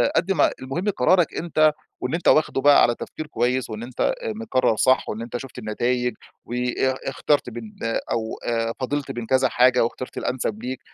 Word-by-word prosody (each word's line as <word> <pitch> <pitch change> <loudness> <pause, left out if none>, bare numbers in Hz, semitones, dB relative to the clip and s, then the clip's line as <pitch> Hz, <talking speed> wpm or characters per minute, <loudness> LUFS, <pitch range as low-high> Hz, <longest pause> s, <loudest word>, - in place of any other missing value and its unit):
قد 170 +4 +2
ما 170 -7 +3
المهم 135 +10 -2
قرارك 180 0 +3
أنتَ، 155 -2 +3 0.3
وإن - - -2
أنتَ 170 - -1
واخده 145 -2 +4
على 120 - +4
تفكير 155 - -7
كويِس، 125 -3 0
وإن 110 +1 -6
أنتَ 130 - -1
مقرِّر 215 - 0
صح، 130 0 +3
وإن 110 - -4
أنتَ 120 +1 -4
شُفت 130 0 -9
النتايِج، 125 +3 -1 0.3
وا 120 - -5 0.5
اختَرت 140 0 +1
بين 115 -2 -9
ده 115 0 -1
أو 110 -1 -1
آآ، 115 -1 0
فاضلت 140 +2 -2
بين 120 -1 -5
كذا 130 +3 +2
حاجة 125 0 +4
واختَرت 125 +2 -5
الأنسَب 115 -3 -2
ليك. 130 +1 -4
130 Hz, 175 wpm, -23 LUFS, 120-150 Hz, 0.5 s, واخده